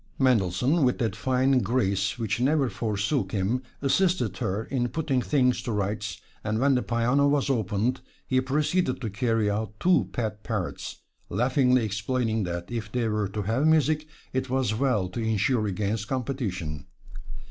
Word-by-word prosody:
Mendelssohn, 125 - +2
with 125 -1 +2
that 110 -6 -1
fine 130 +3 +2
grace 110 -3 0
which 110 -3 -1
never 135 0 +2
forsook 105 0 -1
him, 105 +5 0 0.2
assisted 140 - +2
her 100 +4 -1
in 120 0 -1
putting 140 -2 0
things 125 -2 +2
to 120 - -4
rights, 105 0 -2 0.2
and 105 +1 -1
when 135 +4 +3
the 125 - +2
piano 125 +5 +2
was 140 -1 +2
opened, 110 +1 0 0.2
he 130 -1 +2
proceeded 145 +2 0
to 115 -5 -4
carry 115 0 +1
out 105 +1 -2
two 180 0 +3
pet 110 -3 -3
parrots, 105 -6 -4 0.3
laughingly 125 +3 +2
explaining 110 +1 -1
that 85 +2 -5
if 110 -3 -4
they 120 -2 0
were 105 -2 0
to 105 +1 -3
have 115 +9 +1
music, 155 -1 +3 0.3
it 130 0 -1
was 130 -4 +1
well 110 -5 +1
to 95 - -6
insure 110 +1 +1
against 105 +2 -2
competition. 100 - -3
120 Hz, 160 wpm, -26 LUFS, 105-130 Hz, 0.3 s, when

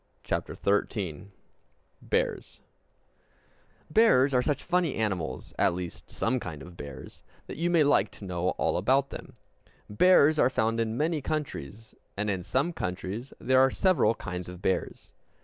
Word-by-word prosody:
CHAPTER - - -3
XIII 100 -3 -1 0.7
Bears - - -2 1.3
Bears 145 - +5
are 125 - +4
such 145 +1 -1
funny 175 -4 +1
animals, 90 -11 -3
at - - +3
least 90 -2 -7
some 125 +3 0
kinds 80 - -7
of 90 0 -13
bears, 70 -5 -10 0.2
that - - -8
you 170 +2 0
may 170 -3 +4
like 145 - +3
to 100 - -10
know 90 -1 -1
all - - +1
about 130 +9 +2
them. - - -9 0.5
Bears 155 - +5
are 125 - +5
found 115 -2 0
in 115 0 -1
many 155 +1 0
countries, 115 - -5 0.2
and 105 0 0
in 95 -2 -2
some 135 - 0
countries 95 - -4
there 130 0 +3
are 135 0 +6
several 170 - +2
kinds 90 -3 -6
of 90 -1 -9
bears. 95 0 -2
115 Hz, 150 wpm, -28 LUFS, 90-140 Hz, 1.3 s, are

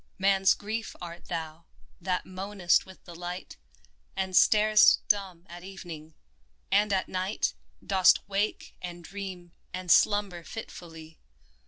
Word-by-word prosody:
Man's 195 0 +4
Grief 220 +2 -5
art 170 0 -9
thou, 160 0 -5 0.4
that 180 +1 -1
moanest 185 -1 0
with 190 - -14
the 175 - -10
light, 175 +2 -7 0.6
And 190 -1 -2
starest 215 +1 +6
dumb 190 -4 0
at 175 +1 -10
evening 170 -5 -9 0.3
— - - -41
and 205 +1 +3
at 190 -1 +1
night 185 +3 -1 0.3
Dost 190 -2 +4
wake 200 +2 -2
and 175 -1 -7
dream 185 -1 -7 0.2
and 185 -1 -3
slumber 205 -5 +3
fitfully 165 -6 -10
185 Hz, 130 wpm, -28 LUFS, 175-200 Hz, 0.6 s, starest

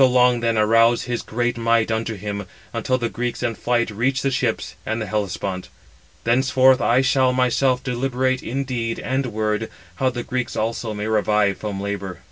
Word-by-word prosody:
So 130 - +8
long 125 -1 +4
then 115 -1 0
arouse 115 +2 +4
his 120 -1 -2
great 120 +1 -2
might 115 -1 +2
unto 110 0 -1
him, 100 -1 -5 0.3
until 130 - 0
the 120 -2 -1
Greeks 120 +1 -3
in 120 -1 0
flight 120 0 0
reach 130 +5 0
the 135 - +1
ships 125 -3 -1
and 110 +1 -2
the 110 - -2
Hellespont. 100 -3 -3 0.5
Thenceforth 130 +2 +4
I 120 +3 +4
shall 130 -1 +3
myself 125 0 +2
deliberate 130 0 0
in 135 +4 -2
deed 120 -4 -2
and 130 +1 -1
word, 110 -1 -1 0.3
how 130 - +2
the 120 -1 -4
Greeks 125 -1 -3
also 110 0 -2
may 105 0 -3
revive 105 -2 +2
from 105 -2 -4
labour." 100 -2 -4
120 Hz, 180 wpm, -22 LUFS, 110-130 Hz, 0.5 s, So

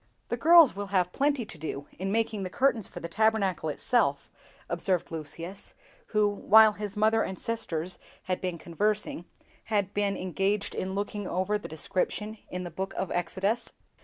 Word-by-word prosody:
"THE - - 0
girls 320 - +7
will 200 0 -4
have 185 -2 +1
plenty 280 -1 +1
to 180 - -10
do 145 -2 -5
in 190 +1 -2
making 220 -1 0
the 185 - -3
curtains 235 -1 +1
for - - -9
the 170 - -5
Tabernacle 200 -4 +1
itself," 145 - +1 0.4
observed 175 0 -1
Lucius, 165 +4 -6 0.3
who, 210 -1 +3
while 215 +1 +6
his 210 0 -6
mother 220 +1 +4
and 190 - -3
sisters 185 -7 -3 0.2
had 185 -1 -2
been 180 -2 -2
conversing, 200 +1 -1 0.4
had 205 -3 0
been 200 -1 0
engaged 195 +3 -1
in 190 +1 -3
looking 205 0 -3
over 190 +4 0
the - - -8
description 205 +6 -2
in 180 0 -4
the 175 - -6
book 190 +4 -4
of 190 - -2
Exodus. 195 +6 -1
200 Hz, 165 wpm, -28 LUFS, 180-215 Hz, 0.4 s, girls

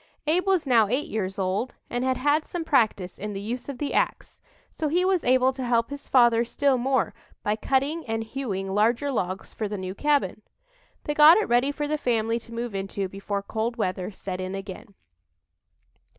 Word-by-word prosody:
Abe 350 +5 +1
was 375 -5 +2
now 235 -5 +4
eight 265 - -1
years 195 -5 -3
old, 195 +6 -1
and 245 +1 -2
had 260 -1 +1
had 295 +3 +2
some 345 +1 -5
practice 220 - +1
in 210 +1 -4
the 195 - -4
use 240 +6 -5
of 275 - -5
the 290 +1 -3
ax, - - -1 0.3
so 315 - -2
he 350 +5 +2
was 375 -2 +2
able 255 +1 +3
to 260 0 -5
help 235 +1 +1
his 285 0 -7
father 240 -2 +5
still 275 +3 +1
more 260 0 +1 0.3
by 210 - +1
cutting 275 +8 0
and 225 0 -1
hewing 205 -6 -4
larger 230 +7 +2
logs 190 -5 -3
for 215 - -3
the 205 0 -4
new 185 0 -5
cabin. 280 -5 0 0.6
They 295 - -2
got 305 +4 +8
it 435 - +1
ready 245 +4 +3
for 295 0 -3
the 305 0 -1
family 230 -3 0
to 230 - -14
move 235 -1 -4
into 195 0 -3
before 200 +1 -4
cold 225 +3 -2
weather 185 -5 -2
set 185 -2 -6
in 185 +1 -4
again. 195 +2 -8
235 Hz, 195 wpm, -25 LUFS, 200-280 Hz, 0.6 s, got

